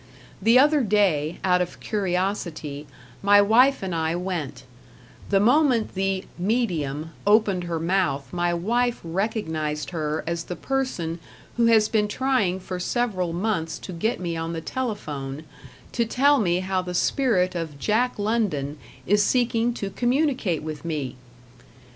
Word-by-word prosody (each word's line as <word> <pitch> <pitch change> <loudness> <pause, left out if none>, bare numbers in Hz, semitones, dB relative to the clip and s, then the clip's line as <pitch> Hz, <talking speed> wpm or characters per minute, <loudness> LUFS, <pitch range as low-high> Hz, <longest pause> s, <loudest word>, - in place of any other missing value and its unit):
The 225 +5 +5
other 295 +2 +5
day, 190 - +1
out 180 -1 +3
of 180 - -4
curiosity, 180 -7 -2 0.3
my 205 +1 +6
wife 235 +5 +4
and 185 -2 -3
I 160 0 0
went; 175 -5 -4 0.7
the 195 - +4
moment 245 +1 +3
the 195 0 -1
"medium" 165 - -1 0.2
opened 205 -4 +3
her 170 -1 -2
mouth 160 -7 0
my 175 0 +1
wife 235 +8 0
recognized 160 - -2
her 155 -2 -2
as 170 0 -3
the 180 - -5
person 185 -13 -2 0.4
who 235 -1 +3
has 220 -2 +5
been 210 -2 +1
trying 210 -6 0
for 185 0 -6
several 185 -4 -1
months 170 -3 -1
to 185 - -8
get 220 +8 -1
me 170 -2 -3
on 165 +1 -3
the 165 - -3
telephone 155 - -4 0.5
to 235 - +1
tell 275 +5 +3
me 180 -3 +1
how 185 0 -1
the 180 0 -5
spirit 185 -6 +2
of 165 -4 -4
Jack 225 - +1
London 200 -10 -1 0.3
is 205 +2 +3
seeking 240 0 +2
to 200 -3 -4
communicate 250 - 0
with 155 -2 -6
me! 145 -6 -3
185 Hz, 145 wpm, -24 LUFS, 165-225 Hz, 0.7 s, my